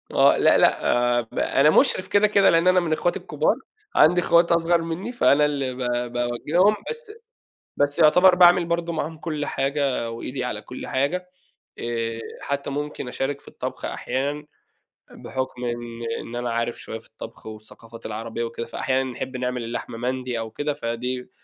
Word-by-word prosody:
آه، - - +5
لأ، - - +5
لأ، - - +3 0.3
آآ - - +2
ب 115 - -7
أنا 140 +3 +3
مشرف 185 - +3
كده 205 +1 +4
كده 200 -1 +4
لإن 165 +2 +3
أنا 185 0 +6
من 170 -3 -1
إخواتي 175 +2 0
الكبار. - - 0 0.4
عندي 175 +3 +5
إخوات 170 0 +4
أصغر 170 0 +3
مني، 165 +7 -4
فأنا 150 - +4
اللي 140 -3 -1
ب - - -11
ب 120 -1 -2
باوجههم، 145 - +2
بس 465 -1 -6 0.7
بس 145 0 +1
يعتبر 180 +4 +6
باعمل 175 -1 +6
برضه 170 0 -1
معاهم 160 0 -3
كل 155 -2 -3
حاجة 135 -4 -1
وإيدي 125 +3 -5
على 110 -4 -3
كل 125 +4 -8
حاجة. 165 +8 -1 0.5
آآ، 115 -1 -3 0.2
حتى 140 0 -3
ممكن 145 -1 -4
أشارك 135 +3 -3
في - - -20
الطبخ - - -6
أحيانًا 145 +3 -3 0.7
بحكم 130 -1 -5
إن 120 -1 -5 0.2
إن 120 - -8
أنا 120 0 -2
عارف 115 0 -1
شوية 110 - -6
في 115 - -16
الطبخ 110 0 -11
والثقافات 110 +1 -11
العربية 115 +2 -4
وكده، 115 0 -5
فأحيانًا 130 +2 -1
بنحب 130 +1 -5
نعمل 125 -1 -2
اللحمة 115 0 -5
مندي 125 0 -2
أو 115 -1 -5
كده، 145 +6 -2
فدي 125 -1 -4
135 Hz, 170 wpm, -23 LUFS, 120-165 Hz, 0.7 s, أنا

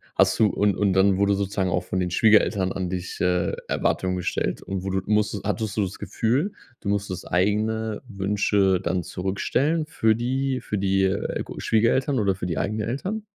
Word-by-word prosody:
hast - - +3
du 110 - +6
und 100 -1 +1
und 100 -2 +2
dann 95 0 +4
wurde 100 +1 +3
sozusagen 95 -1 -1
auch - - 0
von 95 - -2
den 90 -1 0
Schwiegereltern 105 -1 +3
an 95 -2 -3
dich, 90 0 -5
äh, 90 -1 +1
Erwartungen 90 0 0
gestellt 90 - -2
und 95 -1 -4
wo 95 - -3
du 95 0 0
musst 105 -1 +1
hattest 105 0 -2
du - - +3
das 95 0 -5
Gefühl, 135 - 0 0.3
du 100 - -3
musstest 100 -2 -3
eigene 105 +3 0
Wünsche 100 -2 +1
dann 90 0 -1
zurückstellen 130 - -1
für 110 -8 +2
die 130 +3 -1
für 105 - -3
die, 95 0 +1
äh, 95 +1 -1
g - - -9
Schwiegereltern 125 +4 +2
oder 100 -2 +2
für 90 - -5
die 85 -4 -3
eigenen 105 +4 -1
Eltern? 195 - -3
100 Hz, 190 wpm, -24 LUFS, 95-110 Hz, 0.3 s, du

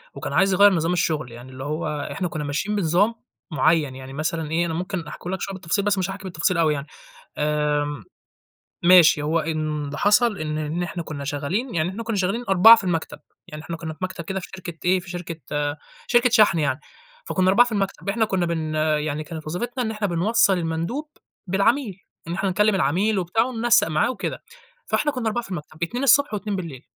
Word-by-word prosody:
وكان - - -5
عايز 195 +1 +3
يغيَّر 200 +1 +6
نظام 165 +1 0
الشغل، 155 -7 -1
يعني 120 +2 -11
اللي 130 +1 -8
هو 150 -1 -3
إحنا 180 - -2
كنا 155 -2 -5
ماشيين 150 +9 -2
بنظام 200 +4 +2 0.4
معين، 150 -1 +2
يعني 130 0 -9
مثلًا 155 +1 -3
إيه، 170 +2 +1
أنا 165 - -3
ممكن 180 0 -4
أحكيهولك 185 +5 -6
شوية 195 - -4
بالتفصيل، 190 +2 -2
بس 205 -1 +2
مش 185 -1 -1
هاحكي 195 +1 -7
بالتفصيل 180 -1 -1
أوي 160 -2 +3
يعني، 140 0 -5 0.5
آمم، 150 -1 0 0.8
ماشي. 170 -4 +7
هو 155 +3 +1
إن 155 -2 -2
اللي 140 +1 -6
حصل 210 +3 +3
إن 155 -1 -3
إن 155 +3 -2
إحنا 175 0 -4
كنا 145 -3 -6
شغالين 155 - -3
يعني 165 +1 +1
إحنا 210 +5 -6
كنا 230 -1 -2
شغالين 195 +6 0
4 195 +5 +9
في 225 - -5
المكتب، 170 -3 -2 0.3
يعني 150 0 -9
إحنا 165 +1 -5
كنا 160 -1 -6
في - - -21
مكتب 185 -2 -4
كده 190 +4 -3
في 185 - -9
شركة 175 -3 -8
إيه، 185 +1 +4
في 175 0 -12
شركة 175 -2 -6 0.7
شركة 240 0 +4
شحْن 215 -7 +4
يعني، 145 -2 0 0.5
فكنا 185 - +1
4 225 +6 +6
في - - -7
المكتب، 200 -1 -2
إحنا 220 +2 +1
كنا 190 -4 0
بن 160 -2 -2
يعني 155 -1 0
كانت 160 -1 -8
وظيفتنا 240 +10 -3
إن 220 - -2
إحنا 215 -1 -2
بنوصَّل 195 +2 +2
المندوب 170 - -3 0.4
بالعميل، 205 +4 +1 0.3
إن 170 - -3
إحنا 195 +2 -1
نكلم 210 +2 +2
العميل 190 +6 +1
وبتاع 185 +6 +1
وننسق 240 -2 +2
معاه 155 +7 +1
وكده. - - -5 0.4
فإحنا 295 - 0
كنا 250 -5 -3
4 240 +2 -2
في 195 - -12
المكتب، 155 -1 -6
2 240 +10 -3
الصبح 280 0 +4
و2 210 0 -2
بالليل. 165 -9 -6
175 Hz, 205 wpm, -23 LUFS, 155-205 Hz, 0.8 s, 4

